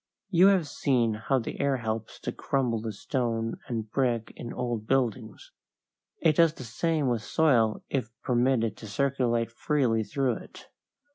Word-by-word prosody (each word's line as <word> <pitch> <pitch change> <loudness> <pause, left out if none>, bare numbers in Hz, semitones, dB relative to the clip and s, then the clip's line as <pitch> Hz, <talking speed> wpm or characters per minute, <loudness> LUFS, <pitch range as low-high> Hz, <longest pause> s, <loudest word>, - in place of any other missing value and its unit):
You 180 +1 +6
have 190 -6 +4
seen 125 -6 +1
how 115 +5 0
the 120 - -4
air 140 -1 +2
helps 110 -2 -4
to - - -3
crumble 125 -5 -1
the 110 0 -3
stone 115 +1 -2
and 115 -3 -3
brick 120 -4 0
in 120 - -7
old 120 -3 -3
buildings. 120 -4 -1 0.7
It 155 -2 +4
does 165 -2 +5
the 130 - -9
same 150 +5 0
with 120 -3 0
soil 115 -5 +2
if 130 -5 -2
permitted 120 -2 +2
to 110 - -9
circulate 120 0 0
freely 120 -3 +1
through 125 +3 0
it. - - -13
120 Hz, 155 wpm, -28 LUFS, 115-135 Hz, 0.7 s, You